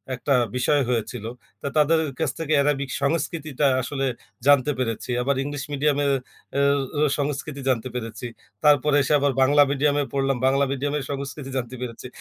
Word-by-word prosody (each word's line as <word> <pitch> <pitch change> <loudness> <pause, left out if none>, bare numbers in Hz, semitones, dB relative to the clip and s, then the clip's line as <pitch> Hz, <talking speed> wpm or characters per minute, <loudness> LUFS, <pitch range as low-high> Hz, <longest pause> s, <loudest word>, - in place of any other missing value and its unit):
একটা 140 +3 0 0.2
বিষয় 140 +3 +2
হয়েছিল। 115 -1 -2 0.4
তো, - - -3
তাদের 160 +2 +4 0.2
কাছ 160 -4 +1
থেকে 155 -1 -1
অ্যারাবিক 140 -1 +1
সংস্কৃতিটা 155 -1 -1 0.2
আসলে 135 +2 -2 0.4
জানতে 145 0 +5
পেরেছি। 115 -1 -3
আবার, 140 +2 +1
ইংলিশ 145 -1 -4
মিডিয়ামের 145 0 +1 0.5
এ - - +3 0.4
এ - - +2 0.2
সংস্কৃতি 140 0 -3
জানতে 125 -1 0
পেরেছি। 115 -1 -5 0.4
তারপরে 150 0 +4
এসে 145 +3 +1
আবার 140 0 +2
বাংলা 145 +2 +5
মিডিয়ামে 145 +1 +2
পড়লাম, 135 -1 +1
বাংলা 135 +1 +3
মিডিয়ামের 145 +1 -2
সংস্কৃতি 140 0 -5
জানতে 125 0 -4
পেরেছি। 125 0 -6
140 Hz, 150 wpm, -24 LUFS, 130-145 Hz, 0.5 s, জানতে